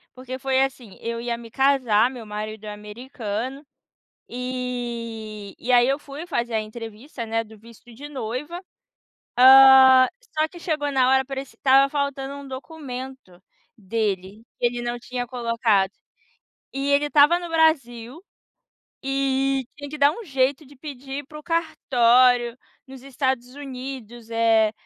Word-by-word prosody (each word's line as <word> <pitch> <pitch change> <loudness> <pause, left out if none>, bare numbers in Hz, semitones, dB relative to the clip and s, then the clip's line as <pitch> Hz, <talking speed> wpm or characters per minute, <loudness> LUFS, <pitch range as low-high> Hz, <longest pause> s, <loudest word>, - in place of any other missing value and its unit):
Porque 255 0 -7
foi 265 0 +1
assim, 250 -7 -6
eu 230 0 -4
ia 235 -1 -2
me 230 -1 -12
casar, 255 -4 +3
meu 245 -4 -9
marido 215 +1 -6
é 210 - -5
americano, 230 +3 -6 0.7
eh, 235 -4 -5
e 250 - -6
aí 245 0 +6
eu 270 +1 +2
fui 295 +5 -9
fazer 240 -8 -2
a 220 - +2
entrevista, 225 +3 -8
né, 225 0 -1
do 220 0 -15
visto 230 +2 -17
de 285 +5 -9
noiva, 270 +6 -5 0.8
hã, 260 0 +9 0.3
só 310 - +3
que 345 +2 -13
chegou 295 -4 -2
na 255 -1 +3
hora 265 0 +4
parecia 270 0 -7
que - - -51
estava 270 +1 +5
faltando 280 -1 -3
um 280 - -9
documento 260 - -9 0.3
dele, 205 0 -3 0.2
que - - +3
ele 240 0 -2
não 240 0 -3
tinha 245 0 -4
colocado. 230 -5 +1 0.8
E 275 +1 -2
ele 285 +1 +3
estava 295 +4 +5
no 350 - -7
Brasil 275 -5 +1 0.9
e 270 0 0
tinha 285 -1 -8
que 300 - -7
dar 285 +1 +5
um 465 - -8
jeito 275 -2 0
de 285 +2 -17
pedir 275 0 -7
pro 300 0 -11
cartório, 250 -7 +3 0.3
nos 265 -1 -11
Estados 260 -2 -2
Unidos, 255 -4 -8
eh, 225 -1 +3
255 Hz, 145 wpm, -23 LUFS, 230-275 Hz, 0.9 s, hã